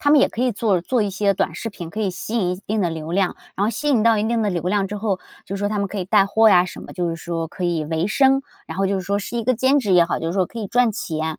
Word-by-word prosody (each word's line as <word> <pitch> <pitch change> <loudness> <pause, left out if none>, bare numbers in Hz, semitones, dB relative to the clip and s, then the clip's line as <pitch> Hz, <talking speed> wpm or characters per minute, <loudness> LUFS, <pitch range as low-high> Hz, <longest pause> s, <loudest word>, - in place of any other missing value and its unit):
他 290 - +2
们 300 - +7
也 - - +4
可 240 - -3
以 255 - +2
做 205 -5 +1
做 245 +7 0
一 205 - +1
些 200 +1 +1
短 195 - -1
视 225 - -5
频， 170 -5 -8
可 215 - -5
以 200 -3 0
吸 185 +5 -6
引 195 -7 +1
一 - - 0
一 180 - -4
定 215 0 0
的 175 - +1
流 160 0 -5
量， 190 -1 +1 0.2
然 200 - 0
后 215 - +1
吸 295 +5 -3
引 250 -7 +3
到 230 -1 +4
一 210 - 0
定 230 0 0
的 205 - +1
流 175 -3 -2
量 195 +1 +1
之 210 - -4
后， 200 -3 -1 0.2
就 195 - -6
是 200 - -4
说 205 - 0
他 210 - -2
们 200 - 0
可 205 - -8
以 185 - -2
带 195 0 +4
货 220 +2 +4
呀 180 -3 +6
什 185 - -8
么， - - -10
就 175 -2 -2
是 165 - -2
说 165 0 -4
可 175 +3 -9
以 170 -3 0
维 160 +4 -1
生， 270 +4 +3 0.2
然 - - -7
后 195 - +1
就 195 - 0
是 - - -2
说 200 0 +1
是 235 +4 -5
一 230 - -2
个 255 +2 +2
兼 260 +4 +3
职 210 -8 0
也 175 -1 +6
好， 170 - -2
就 165 - -4
是 165 - -1
说 190 0 +2
可 235 - -9
以 215 - -3
赚 245 +2 +2
钱。 160 -5 -3
200 Hz, 380 characters per minute, -21 LUFS, 180-225 Hz, 0.2 s, 们